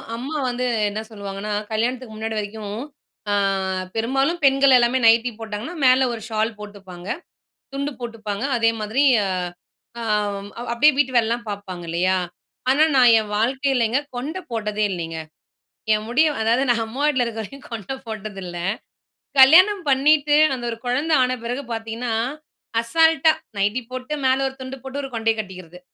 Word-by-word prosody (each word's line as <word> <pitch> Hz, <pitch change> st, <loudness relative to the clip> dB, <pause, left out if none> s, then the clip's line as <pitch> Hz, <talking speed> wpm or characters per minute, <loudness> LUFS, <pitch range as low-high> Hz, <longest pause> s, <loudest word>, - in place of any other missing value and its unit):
அம்மா 270 Hz, +7 st, -5 dB
வந்து 245 Hz, +1 st, -2 dB, 0.2 s
என்ன 210 Hz, +1 st, -4 dB
சொல்லுவாங்கன்னா 200 Hz, -1 st, -6 dB, 0.2 s
கல்யாணத்துக்கு 235 Hz, +2 st, -2 dB
முன்னாடி 220 Hz, 0 st, -4 dB
வரைக்கும் 210 Hz, 0 st, -6 dB, 0.5 s
ஆ -, -, +2 dB, 0.6 s
பெரும்பாலும் 270 Hz, +9 st, 0 dB
பெண்கள் 270 Hz, -1 st, +5 dB
எல்லாமே 245 Hz, +1 st, +2 dB
நைட்டீ 230 Hz, +2 st, +5 dB
போட்டாங்கன்னா 225 Hz, +8 st, -6 dB
மேல 255 Hz, +1 st, +5 dB
ஒரு 230 Hz, -, -6 dB
ஷால் 220 Hz, +1 st, 0 dB
போட்டுப்பாங்க, 195 Hz, -4 st, -10 dB, 0.7 s
துண்டு 280 Hz, +1 st, -2 dB
போட்டுப்பாங்க. 220 Hz, -2 st, -5 dB
அதே 230 Hz, -1 st, +3 dB
மாதிரி 220 Hz, +7 st, +1 dB, 1.0 s
அம் 205 Hz, -2 st, -1 dB, 0.2 s
அப்படியே 275 Hz, +6 st, +5 dB
வீட்டு 265 Hz, -3 st, +1 dB
வேலைலாம் 235 Hz, 0 st, 0 dB
பார்ப்பாங்க 190 Hz, -4 st, -6 dB
இல்லையா? 185 Hz, +3 st, +1 dB, 0.5 s
ஆனா 290 Hz, +3 st, +4 dB
நான் 245 Hz, -3 st, +7 dB
என் 210 Hz, -1 st, -5 dB
வாழ்க்கையிலங்க 260 Hz, 0 st, +1 dB, 0.2 s
கொண்ட 300 Hz, +9 st, -4 dB
போட்டதே 215 Hz, -2 st, -1 dB
இல்லைங்க. 165 Hz, -2 st, -4 dB, 0.7 s
என் 215 Hz, 0 st, -1 dB
முடிய 270 Hz, +7 st, +3 dB
அதாவது 230 Hz, +4 st, +2 dB
நா -, -, +3 dB
அம்மா 255 Hz, +5 st, -6 dB
வீட்ல 260 Hz, -5 st, +2 dB
இருக்க 225 Hz, -1 st, -5 dB
வரைக்கும் 275 Hz, +6 st, -11 dB
கொண்ட 225 Hz, +3 st, -5 dB
போட்டதில்ல. 195 Hz, -5 st, -6 dB, 0.8 s
கல்யாணம் 365 Hz, +9 st, +7 dB
பண்ணீட்டு 295 Hz, +2 st, +4 dB, 0.2 s
அந்த 250 Hz, -2 st, -5 dB
ஒரு 225 Hz, -, -5 dB
குழந்த 285 Hz, +7 st, 0 dB
ஆன 255 Hz, 0 st, 0 dB
பிறகு 245 Hz, +4 st, -3 dB
பார்த்தீங்கன்னா, 225 Hz, +1 st, -4 dB, 0.7 s
அசால்ட்டா 320 Hz, +5 st, +4 dB, 0.3 s
நைட்டி 210 Hz, +6 st, +1 dB
போட்டு, 255 Hz, +3 st, -5 dB
மேல 260 Hz, 0 st, +4 dB
1 265 Hz, -, -7 dB
துண்டு 260 Hz, +1 st, -6 dB
போட்டு, 270 Hz, +1 st, -5 dB
ஒரு 270 Hz, -, -5 dB
கொண்டைய 225 Hz, 0 st, +1 dB
கட்டிக்கிறது. 185 Hz, -4 st, -8 dB
230 Hz, 145 wpm, -22 LUFS, 210-265 Hz, 1.0 s, நான்